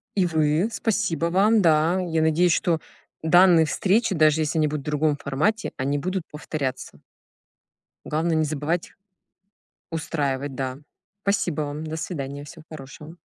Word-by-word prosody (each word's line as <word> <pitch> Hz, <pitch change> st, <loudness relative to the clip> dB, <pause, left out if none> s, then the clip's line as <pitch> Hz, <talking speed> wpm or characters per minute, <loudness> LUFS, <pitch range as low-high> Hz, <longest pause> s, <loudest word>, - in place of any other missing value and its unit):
И 190 Hz, -3 st, +3 dB
вы. 160 Hz, +3 st, +1 dB
Спасибо 205 Hz, -9 st, -1 dB
вам. 205 Hz, +5 st, +3 dB
Да. 165 Hz, +2 st, +3 dB
Я 165 Hz, -3 st, -1 dB
надеюсь, 160 Hz, +3 st, +3 dB
что 170 Hz, -2 st, +1 dB, 0.4 s
данные 175 Hz, 0 st, +6 dB
встречи, 200 Hz, +6 st, +1 dB
даже 155 Hz, 0 st, +4 dB
если 155 Hz, +1 st, -1 dB
они 155 Hz, -1 st, +3 dB
будут 150 Hz, -1 st, -3 dB
в -, -, -23 dB
другом 150 Hz, 0 st, +1 dB
формате, 150 Hz, +13 st, -1 dB
они 140 Hz, +2 st, -1 dB
будут 185 Hz, +3 st, -2 dB
повторяться. 150 Hz, -3 st, -5 dB, 1.1 s
Главное- 160 Hz, +2 st, 0 dB
не 155 Hz, -, +2 dB
забывать 155 Hz, +3 st, -2 dB, 1.0 s
устраивать, 145 Hz, -4 st, -2 dB
да. 130 Hz, 0 st, -4 dB, 0.4 s
Спасибо 180 Hz, -6 st, 0 dB
вам! 145 Hz, +1 st, -4 dB
До 155 Hz, 0 st, -5 dB
свидания! 145 Hz, -3 st, -5 dB
Всего 155 Hz, +2 st, -12 dB
хорошего! 150 Hz, +2 st, -10 dB
160 Hz, 140 wpm, -24 LUFS, 150-175 Hz, 1.1 s, данные